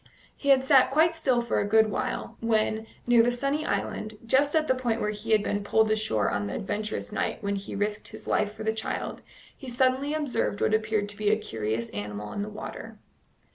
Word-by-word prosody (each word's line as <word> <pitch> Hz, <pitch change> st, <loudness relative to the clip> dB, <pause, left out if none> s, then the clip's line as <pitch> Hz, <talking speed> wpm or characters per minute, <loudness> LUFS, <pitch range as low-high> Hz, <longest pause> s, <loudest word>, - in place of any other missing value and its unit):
He 280 Hz, -, -3 dB
had 265 Hz, -1 st, +6 dB
sat 265 Hz, -1 st, +5 dB
quite 315 Hz, +5 st, +4 dB
still 260 Hz, -7 st, +1 dB
for 235 Hz, -, 0 dB
a 200 Hz, -, 0 dB
good 220 Hz, 0 st, +4 dB
while, -, -, -3 dB
when, 220 Hz, -1 st, 0 dB, 0.2 s
near 240 Hz, -1 st, +6 dB
the 240 Hz, +1 st, +3 dB
sunny 275 Hz, +5 st, -1 dB
island, 215 Hz, 0 st, -3 dB
just 280 Hz, +6 st, +3 dB
at 310 Hz, -1 st, +2 dB
the -, -, +4 dB
point 240 Hz, -3 st, -1 dB
where 210 Hz, -, 0 dB
he 210 Hz, +2 st, -8 dB
had 215 Hz, -2 st, +4 dB
been 205 Hz, 0 st, -1 dB
pulled 220 Hz, +1 st, +3 dB
ashore 215 Hz, -, +1 dB
on 100 Hz, +1 st, -1 dB
the 100 Hz, -, -4 dB
adventurous 210 Hz, +2 st, -3 dB
night 210 Hz, -, -2 dB
when 200 Hz, 0 st, 0 dB
he 195 Hz, 0 st, -6 dB
risked 210 Hz, +1 st, -2 dB
his -, -, -10 dB
life 210 Hz, -1 st, +1 dB
for 220 Hz, +1 st, -8 dB
the 220 Hz, 0 st, +1 dB
child, 220 Hz, -, -4 dB, 0.3 s
he 265 Hz, -, -9 dB
suddenly 260 Hz, +4 st, +1 dB
observed 290 Hz, -8 st, -1 dB
what -, -, +1 dB
appeared 215 Hz, -1 st, +1 dB
to 205 Hz, -, -9 dB
be 210 Hz, -1 st, +1 dB
a 215 Hz, -, +4 dB
curious 110 Hz, -, -3 dB
animal 105 Hz, 0 st, -5 dB
in 200 Hz, -, -3 dB
the 205 Hz, -, -3 dB
water. 210 Hz, -, -8 dB
220 Hz, 215 wpm, -27 LUFS, 205-255 Hz, 0.3 s, had